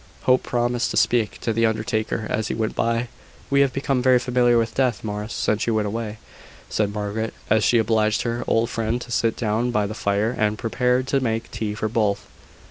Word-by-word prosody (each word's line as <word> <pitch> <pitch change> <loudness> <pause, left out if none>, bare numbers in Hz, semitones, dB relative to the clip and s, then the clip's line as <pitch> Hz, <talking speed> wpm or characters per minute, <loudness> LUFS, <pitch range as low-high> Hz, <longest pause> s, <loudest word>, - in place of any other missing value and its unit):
Hope 130 0 +4
promised 120 0 0
to - - -2
speak 115 -4 +2
to 115 - -1
the 115 +1 +3
undertaker 110 0 -1
as 110 0 -1
he - - -2
went 110 -1 -1
by. 115 +1 0 0.4
"We 140 0 +5
have 140 -2 +3
become 135 -1 0
very 130 0 +5
familiar 120 -1 +2
with 115 -1 0
death, 125 -4 0
Morris, 105 0 -4
since 110 +1 0
you 115 - +1
went 110 -1 +1
away," 110 +1 -4 0.5
said 105 -1 0
Margaret, 105 +2 -3 0.2
as 110 -1 +4
she 120 - +4
obliged 110 -1 +2
her 120 0 -2
old 115 +1 +2
friend 115 +1 -1
to 125 - -9
sit 115 -1 +1
down 115 +2 0
by 105 -4 +1
the 105 - -4
fire, 105 +2 0
and 105 0 0
prepared 125 +3 +1
to 140 - +2
make 115 -3 -2
tea 105 -2 -3
for 110 - -2
both. 105 -3 0
115 Hz, 210 wpm, -23 LUFS, 110-120 Hz, 0.5 s, We